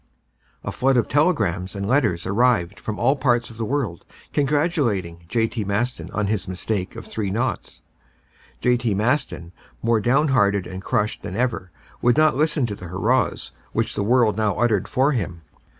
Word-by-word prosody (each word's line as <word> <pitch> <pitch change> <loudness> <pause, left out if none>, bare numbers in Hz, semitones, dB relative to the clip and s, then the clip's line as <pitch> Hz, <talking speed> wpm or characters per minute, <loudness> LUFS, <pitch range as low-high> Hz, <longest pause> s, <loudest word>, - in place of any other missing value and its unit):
A - - -3
flood 135 0 +2
of 120 - +2
telegrams 100 - +1
and 100 0 -3
letters 110 -9 +1
arrived 105 -3 +2
from 105 0 -5
all 135 +4 +3
parts 120 -4 +1
of 110 - -13
the 115 - -1
world 120 - -2 0.3
congratulating 135 - 0
J.T. 115 +3 0
Maston 110 +6 -2
on 105 - -1
his 100 -1 -1
mistake 95 +1 -3
of - - -8
three 105 -3 -3
naughts. 115 +7 -3 0.8
J.T. 120 -4 +2
Maston, 110 - 0 0.3
more 115 -1 +3
downhearted 120 -6 +2
and 95 +1 -7
crushed 105 0 -1
than 90 - -6
ever, 115 -6 -1 0.3
would 120 +3 +3
not 155 -2 +4
listen 150 -2 +2
to 105 -3 -4
the 90 - -9
hurrahs 110 +9 0 0.2
which - - 0
the - - -2
world 110 -1 +3
now 105 -4 +1
uttered 105 -5 +1
for 135 +3 +2
him. 90 - -3
110 Hz, 165 wpm, -23 LUFS, 100-130 Hz, 0.8 s, not